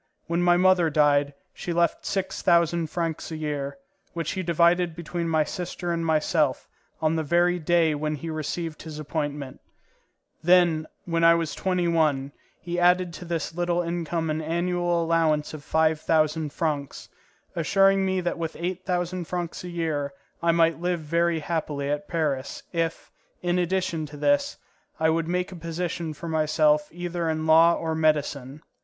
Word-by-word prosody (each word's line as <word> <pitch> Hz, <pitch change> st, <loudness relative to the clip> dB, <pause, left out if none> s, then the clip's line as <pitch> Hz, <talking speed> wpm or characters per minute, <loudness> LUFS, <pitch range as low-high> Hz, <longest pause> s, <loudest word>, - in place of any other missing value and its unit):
When 170 Hz, +1 st, -1 dB
my 175 Hz, 0 st, +4 dB
mother 180 Hz, -2 st, +4 dB
died, 145 Hz, -1 st, +3 dB, 0.2 s
she 175 Hz, -, -4 dB
left 170 Hz, -1 st, +1 dB
six 190 Hz, -1 st, -2 dB
thousand 170 Hz, -1 st, +3 dB
francs 165 Hz, -2 st, -3 dB
a 160 Hz, -, -5 dB
year, 145 Hz, -2 st, -3 dB, 0.4 s
which 165 Hz, -3 st, -3 dB
he 190 Hz, -, -3 dB
divided 170 Hz, 0 st, +2 dB
between 170 Hz, 0 st, -4 dB
my 160 Hz, -1 st, +3 dB
sister 175 Hz, +1 st, -4 dB
and 165 Hz, 0 st, -2 dB
myself 155 Hz, -3 st, +1 dB, 0.4 s
on 155 Hz, +1 st, +2 dB
the 160 Hz, -, 0 dB
very 175 Hz, +3 st, +2 dB
day 165 Hz, -1 st, +3 dB
when 150 Hz, +1 st, -2 dB
he 160 Hz, +3 st, -6 dB
received 155 Hz, +1 st, -4 dB
his 155 Hz, -1 st, -8 dB
appointment; 145 Hz, -3 st, -4 dB, 0.8 s
then, 170 Hz, -2 st, +4 dB, 0.2 s
when 165 Hz, -1 st, 0 dB
I 165 Hz, 0 st, +7 dB
was 165 Hz, -2 st, -2 dB
twenty 180 Hz, -2 st, 0 dB
one, 150 Hz, -5 st, +1 dB, 0.3 s
he 175 Hz, 0 st, -3 dB
added 180 Hz, 0 st, +3 dB
to 175 Hz, -, -8 dB
this 165 Hz, -2 st, -3 dB
little 175 Hz, 0 st, 0 dB
income 170 Hz, -1 st, -2 dB
an 155 Hz, +1 st, -2 dB
annual 175 Hz, +1 st, 0 dB
allowance 160 Hz, -3 st, +1 dB
of 155 Hz, -2 st, -8 dB
five 160 Hz, 0 st, +2 dB
thousand 155 Hz, -1 st, +1 dB
francs, 145 Hz, -4 st, -3 dB, 0.5 s
assuring 195 Hz, +3 st, +3 dB
me 190 Hz, -1 st, 0 dB
that 175 Hz, -1 st, -2 dB
with 165 Hz, -1 st, -4 dB
eight 180 Hz, +2 st, -3 dB
thousand 180 Hz, -1 st, -2 dB
francs 175 Hz, 0 st, -4 dB
a 180 Hz, -, -6 dB
year 155 Hz, -5 st, -2 dB, 0.3 s
I 170 Hz, 0 st, +3 dB
might 165 Hz, -1 st, +2 dB
live 175 Hz, -1 st, -1 dB
very 170 Hz, +1 st, +1 dB
happily 150 Hz, -3 st, -2 dB
at 150 Hz, 0 st, -3 dB
Paris, 145 Hz, -5 st, -2 dB
if, 165 Hz, -1 st, -2 dB, 0.3 s
in 175 Hz, 0 st, +1 dB
addition 175 Hz, -3 st, -1 dB
to 145 Hz, 0 st, -11 dB
this, 285 Hz, -, +1 dB, 0.4 s
I 160 Hz, 0 st, +3 dB
would 165 Hz, 0 st, 0 dB
make 180 Hz, +2 st, -1 dB
a -, -, -8 dB
position 170 Hz, -1 st, -4 dB
for 170 Hz, -, -8 dB
myself 155 Hz, -1 st, +2 dB
either 175 Hz, -1 st, -3 dB
in 155 Hz, 0 st, -1 dB
law 165 Hz, +2 st, +6 dB
or 160 Hz, -1 st, -2 dB
medicine. 150 Hz, -2 st, 0 dB
165 Hz, 165 wpm, -25 LUFS, 155-175 Hz, 0.8 s, I